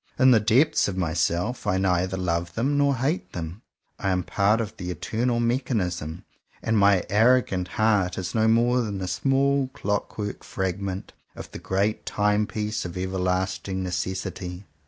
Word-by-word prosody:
In 130 0 +6
the 115 - +6
depths 120 +9 +3
of 95 -2 -4
myself, 85 +6 -1
I 95 -2 +2
neither 95 0 +1
love 85 -1 -2
them 135 +5 +1
nor 140 -1 +3
hate 135 +8 -2
them: 85 +4 -6 0.4
I 95 - -1
am 90 -1 +1
part 100 +6 +2
of 110 -4 -4
the 90 - -5
Eternal 115 +8 -1
Mechanism, 95 - -1 0.4
and 115 - +1
my 100 -3 +4
arrogant 110 -4 +3
heart 100 -2 +1
is 90 -1 -4
no 110 -1 +3
more 120 +2 +3
than 105 -4 -3
a 95 - -3
small 135 +7 +1
clock 100 0 -2
work 105 -1 -4
fragment 95 0 -4 0.2
of - - -9
the - - -7
great 100 +3 -1
Time 105 0 +1
piece 105 0 -3
of 90 0 -6
everlasting 95 +1 -1
Necessity. 90 +1 -4
100 Hz, 160 wpm, -25 LUFS, 90-115 Hz, 0.4 s, In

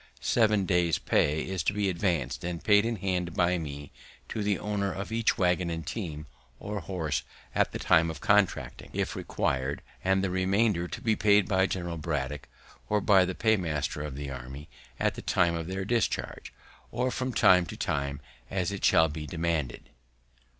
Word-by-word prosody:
Seven 105 -4 +2
days' 90 -4 +2
pay 75 +2 +1
is 95 -1 -3
to - - 0
be 100 -1 0
advanced 85 -8 -1
and 85 -1 -4
paid 105 +1 +5
in 115 - -1
hand 90 -3 -2
by 90 0 +2
me 70 -2 -7 0.4
to 110 - -3
the 100 -1 +1
owner 100 -2 -2
of 100 +4 -5
each 115 0 +1
waggon 90 -1 +1
and 80 -1 -4
team, 80 -9 -5 0.3
or 105 0 -4
horse, 80 -6 -2 0.3
at - - +2
the - - -4
time 80 0 +3
of 80 -2 -6
contracting, - - +1
if - - -2
required, 65 +2 -2 0.2
and 95 0 +2
the 95 - 0
remainder 95 0 +1
to 120 - -7
be 110 -4 +2
paid 105 -2 +4
by 95 -2 +3
General 85 -3 -3
Braddock, 75 -3 -3 0.4
or 105 - +3
by 95 -2 +5
the 95 - -4
paymaster 85 -10 0
of 75 -3 -5
the 70 0 -5
army, 65 +3 -8 0.3
at - - +1
the - - -8
time 85 -1 +2
of 85 -1 -3
their 95 +1 -3
discharge, 115 +1 -1 0.4
or 125 +2 -1
from 130 +1 -2
time 90 -6 +5
to - - -8
time, 70 0 -2 0.3
as 95 0 -1
it 100 - -6
shall 80 - +5
be 75 0 -6
demanded. 80 -6 -2
90 Hz, 180 wpm, -28 LUFS, 80-100 Hz, 0.4 s, paid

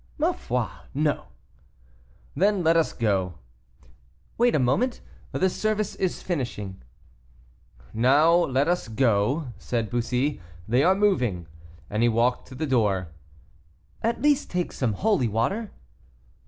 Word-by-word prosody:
"Ma 325 +3 +2
foi! 125 - -2 0.3
no." 150 0 0 1.1
"Then 200 -1 +2
let 165 +1 +4
us 165 -1 +2
go." 95 -6 0 1.0
"Wait 240 +1 +3
a - - +4
moment; 145 - +1 0.3
the 190 - +1
service 215 +2 -1
is 185 -2 -2
finishing." 120 - -4 1.1
"Now 140 +8 +4
let 145 -5 +2
us 175 -5 0
go," 115 +5 +1
said 115 -3 -2
Bussy; 125 +4 -1 0.3
"they 125 +5 +3
are 185 +3 +5
moving;" 125 - +1 0.4
and 105 +2 -2
he 120 - +4
walked 120 +2 +1
to 130 - -11
the 155 - -2
door. 105 - +1 0.9
"At 230 +4 -1
least 290 -1 +3
take 180 -1 -2
some 120 -5 -1
holy 200 - +1
water." 155 - -1
135 Hz, 130 wpm, -25 LUFS, 115-185 Hz, 1.1 s, are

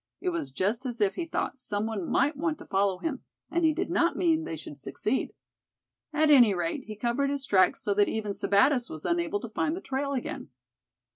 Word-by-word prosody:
It - - -1
was 165 -6 -3
just 205 - -1
as 240 -1 -5
if 205 -2 +2
he 345 - -3
thought 275 -4 -3
some 210 -4 -2
one 215 -6 -3
might 295 +2 +2
want 310 +1 -1
to - - -11
follow 195 -1 +1
him, 280 - -4 0.3
and 340 0 +1
he 320 - +5
did 350 +3 -2
not 340 -1 +2
mean 325 -2 +2
they 160 - -4
should 145 -2 -9
succeed. 210 - -2 0.8
At 305 0 +3
any 240 -8 +7
rate, 175 +10 -2
he 215 - -7
covered 240 +6 0
his 280 -1 -2
tracks 185 -5 +3
so 205 - +1
that 205 0 +3
even 215 -2 -2
Sebattis 240 +7 +2
was 155 +1 -8
unable 170 +3 0
to 235 - -6
find 310 +8 -1
the - - -5
trail 280 -4 -2
again." 255 - -4
235 Hz, 215 wpm, -28 LUFS, 195-290 Hz, 0.8 s, any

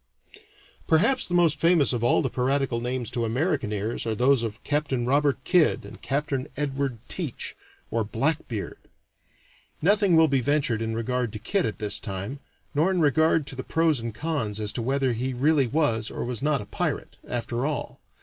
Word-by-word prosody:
Perhaps 215 +12 +3
the 175 - -1
most 165 -4 +3
famous 165 -3 +4
of 120 -1 -2
all 120 - +3
the - - 0
piratical 130 -1 0
names 125 -1 -3
to 120 - -1
American 130 - 0
ears 105 +3 -2
are 110 - 0
those 130 +2 +3
of 110 -2 -5
Capt. 145 0 -1
Robert 135 +3 +2
Kidd 175 0 +3
and - - -11
Capt. 145 +2 -2 0.2
Edward 140 -3 -1
Teach, 160 -10 -4 0.4
or 115 -1 +1
"Blackbeard." 115 -1 -2 1.0
Nothing 200 +1 +4
will 160 0 +6
be 135 -3 +1
ventured 135 -5 +1
in 110 0 -2
regard 125 0 -1
to - - -4
Kidd 180 - 0
at 110 - -4
this 105 -2 +1
time, 100 +6 -5 0.3
nor 155 +6 +2
in 185 -2 +1
regard 160 0 +3
to 135 - -6
the 130 - -5
pros 160 -4 +2
and 115 0 -4
cons 120 -10 -2
as 105 0 -2
to 120 - -3
whether 135 +1 +1
he 125 +3 -2
really 140 +1 +3
was 115 -6 +1
or - - -4
was 120 -2 -4
not 145 -1 +1
a - - -8
pirate, - - -3
after 120 0 -2
all. 150 -2 -4
135 Hz, 185 wpm, -26 LUFS, 115-155 Hz, 1.0 s, will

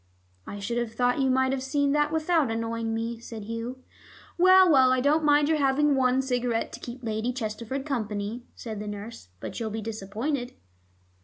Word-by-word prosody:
"I 205 - -6
should 235 +4 -2
have 235 -2 -3
thought 245 +3 +1
you 265 - +2
might 260 0 +2
have 270 -1 -1
seen 280 +1 +1
that 295 +1 +2
without 320 -3 +2
annoying 230 0 -2
me," 225 +1 -3
said 225 -2 -8
Hugh. 230 +4 -6 0.5
"Well, 370 +1 +7
well, 265 -5 +6
I 255 - +3
don't 295 +4 +2
mind 295 0 +4
your 315 -1 +2
having 285 +1 +3
one 260 0 +2
cigarette 245 -3 -1
to - - -7
keep 250 +1 -8
Lady 220 +2 -1
Chesterford 240 +2 -4
company," 220 -4 -3
said 220 -3 -6
the 210 - -6
nurse. 205 - -8
"But - - -6
you'll 225 -2 -2
be 220 +1 -4
disappointed." 225 +5 -3
245 Hz, 185 wpm, -27 LUFS, 225-275 Hz, 0.5 s, Well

